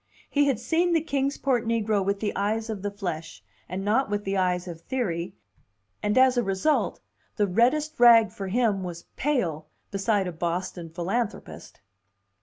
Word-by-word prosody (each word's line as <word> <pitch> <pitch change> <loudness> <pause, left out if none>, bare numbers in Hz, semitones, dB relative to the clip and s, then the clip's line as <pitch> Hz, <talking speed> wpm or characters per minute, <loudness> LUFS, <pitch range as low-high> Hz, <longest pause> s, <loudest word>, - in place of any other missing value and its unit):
He 290 0 +3
had 265 -6 +1
seen 335 +8 +1
the 325 - +3
Kings 280 -3 -1
Port 255 -4 +1
negro 220 -3 +1
with 200 +1 -1
the 210 - -2
eyes 220 +3 -1
of 205 -3 -5
the 205 - -2
flesh, 175 -6 -6 0.3
and 190 +3 -4
not 225 +4 +2
with 205 0 -1
the 195 0 -2
eyes 180 -1 0
of 165 -2 -8
theory, 180 -6 -3 0.7
and 210 +3 0
as 260 -1 +5
a 240 - +3
result 195 +10 0 0.4
the 210 - +2
reddest 250 +11 +1
rag 230 -4 +7
for 195 0 -6
him 210 -1 +1
was 175 -2 -7
pale 175 - -1 0.2
beside 200 0 +1
a 180 - -3
Boston 170 +1 -3
philanthropist! 190 +7 -4
205 Hz, 170 wpm, -26 LUFS, 185-245 Hz, 0.7 s, rag